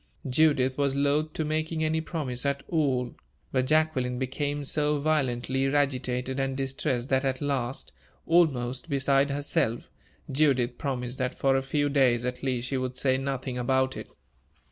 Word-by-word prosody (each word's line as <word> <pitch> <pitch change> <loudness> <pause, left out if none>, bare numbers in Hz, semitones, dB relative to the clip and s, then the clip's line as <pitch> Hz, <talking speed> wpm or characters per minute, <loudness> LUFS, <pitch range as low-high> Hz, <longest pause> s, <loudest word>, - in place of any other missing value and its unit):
Judith 130 -1 +3
was 140 -1 +1
loath 145 +2 +1
to 155 - -2
making 155 +1 -1
any 160 +1 +1
promise 145 -7 -3
at 140 -1 -1
all, 130 -7 0 0.4
but 130 -1 +1
Jacqueline 145 -5 +1
became 145 +3 -2
so 150 +1 0
violently 135 -3 0
agitated 130 -2 0
and 135 0 -1
distressed 135 -2 -2
that 130 0 +2
at 130 -1 -1
last, 130 - -2 0.3
almost 135 -5 +2
beside 140 0 +2
herself, 140 -5 -1 0.4
Judith 130 -4 +2
promised 125 -2 -3
that 130 -1 -2
for 135 -1 +2
a 135 - +2
few 145 +2 0
days, 130 -4 +3
at 125 0 -3
least, 125 -2 -1
she 135 - -1
would 130 0 -3
say 130 0 +2
nothing 130 -1 -3
about 130 +1 +1
it. - - -7
135 Hz, 155 wpm, -27 LUFS, 125-145 Hz, 0.4 s, Judith